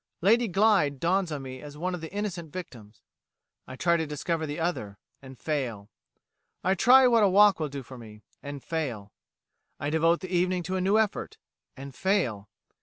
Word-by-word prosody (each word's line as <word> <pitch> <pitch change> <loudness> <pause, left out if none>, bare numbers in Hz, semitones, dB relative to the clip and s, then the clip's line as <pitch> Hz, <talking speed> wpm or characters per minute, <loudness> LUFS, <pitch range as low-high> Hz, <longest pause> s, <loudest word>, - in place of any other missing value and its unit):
Lady 230 +6 +4
Glyde 195 -8 +2
dawns 180 +2 +1
on 145 -3 -4
me 130 -1 -8
as 150 0 -10
one 180 +4 -2
of 180 - -5
the 160 - -7
innocent 185 -6 -4
victims. 115 - -10 0.6
I 130 - -8
try 170 +5 +2
to 160 -1 -2
discover 160 +2 -3
the 150 +3 -5
other 135 - -3 0.2
and 135 -1 -12
fail. 120 -10 -4 0.7
I 190 - +2
try 255 +7 +6
what 235 -2 +4
a 205 - +5
walk 205 0 +5
will 155 -2 -2
do 140 -1 -7
for 130 0 -11
me 105 -2 -13 0.2
and 145 -1 -8
fail. 120 -12 -4 0.7
I 145 - -2
devote 165 +2 +2
the 185 -1 -4
evening 180 0 +1
to 185 +2 -3
a 185 - -1
new 195 +3 +3
effort 220 -2 -1 0.4
and 135 0 -9
fail. 125 - -1
160 Hz, 185 wpm, -27 LUFS, 135-185 Hz, 0.7 s, try